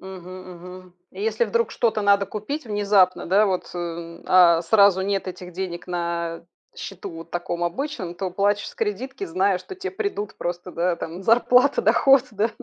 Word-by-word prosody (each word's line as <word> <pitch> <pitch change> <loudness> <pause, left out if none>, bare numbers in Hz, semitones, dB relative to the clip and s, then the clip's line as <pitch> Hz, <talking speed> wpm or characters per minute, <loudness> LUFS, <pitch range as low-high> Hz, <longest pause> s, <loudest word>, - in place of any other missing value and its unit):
Мгм, 185 -1 -10
мгм. 180 +1 -12 0.2
И 190 - -10
если 220 +1 +1
вдруг 230 +1 0
что-то 220 -2 0
надо 200 0 +4
купить 215 +9 -5
внезапно, 205 -3 +2
да, 200 +4 +4
вот, 185 -2 -2
э, 170 -1 -6
а 170 -2 +6
сразу 200 +1 +5
нет 195 0 -1
этих 180 -1 -8
денег 180 -1 -5
на 170 -1 -3 0.3
счету 195 0 -7
вот 165 0 -11
таком 175 0 -2
обычном, 185 - -4
то 185 0 -4
платишь 205 +2 0
с - - -13
кредитки, 225 +2 -3
зная, 185 +2 +1
что 280 - -10
те 380 +1 -5
придут 385 - -4
просто, 175 +1 -4
да, 175 +1 0
там 170 +3 -7
зарплата, 250 +4 +4
доход, 270 -2 +5
да. 210 +2 0
190 Hz, 170 wpm, -23 LUFS, 175-210 Hz, 0.3 s, а